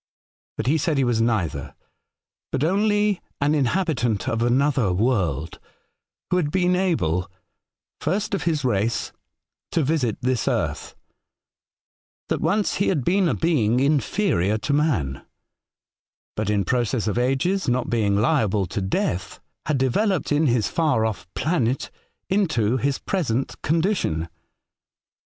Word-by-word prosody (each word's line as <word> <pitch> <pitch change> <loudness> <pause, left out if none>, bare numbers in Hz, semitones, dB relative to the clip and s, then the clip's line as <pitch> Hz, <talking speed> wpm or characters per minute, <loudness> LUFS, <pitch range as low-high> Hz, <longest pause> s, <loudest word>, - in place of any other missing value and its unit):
But - - -2
he 150 +5 +2
said 150 0 0
he 135 - +3
was 120 -2 +1
neither, 110 -8 -1 0.8
but 135 - -1
only 205 +3 +2 0.2
an 145 +1 +2
inhabitant 135 - 0
of 115 0 -1
another 125 -2 +2
world, 90 - 0 0.7
who 180 - +3
had 160 -5 +1
been 180 +2 +2
able 95 - 0 0.3
— - - -69
first 210 +2 -1
of 195 - 0
his 155 -5 0
race 115 -1 0 0.3
— - - -66
to 165 - +2
visit 135 -6 0
this 125 -3 -1
earth: - - -2 1.3
that - - -1
once 205 0 +1
he 200 - +1
had 150 -9 +1
been 185 -1 +3
a - - 0
being 125 -9 +2
inferior 140 - +1
to 140 +6 -2
man, 115 - 0 1.1
but 105 -1 -2
in 100 -2 +1
process 120 0 0
of 110 +2 0
ages, 135 +7 +1
not 125 0 0
being 105 -4 +2
liable 110 -6 +2
to 100 +3 -4
death, 95 -1 -2 0.3
had 150 -2 +1
developed 155 - +1
in 150 +1 +3
his 120 -3 +2
far 150 -9 +1
ofi* 110 -4 -3
planet 140 -6 0 0.4
into 145 - +1
his 135 +1 0
present 135 - -2
condition. 160 - 0
130 Hz, 135 wpm, -23 LUFS, 110-165 Hz, 1.3 s, he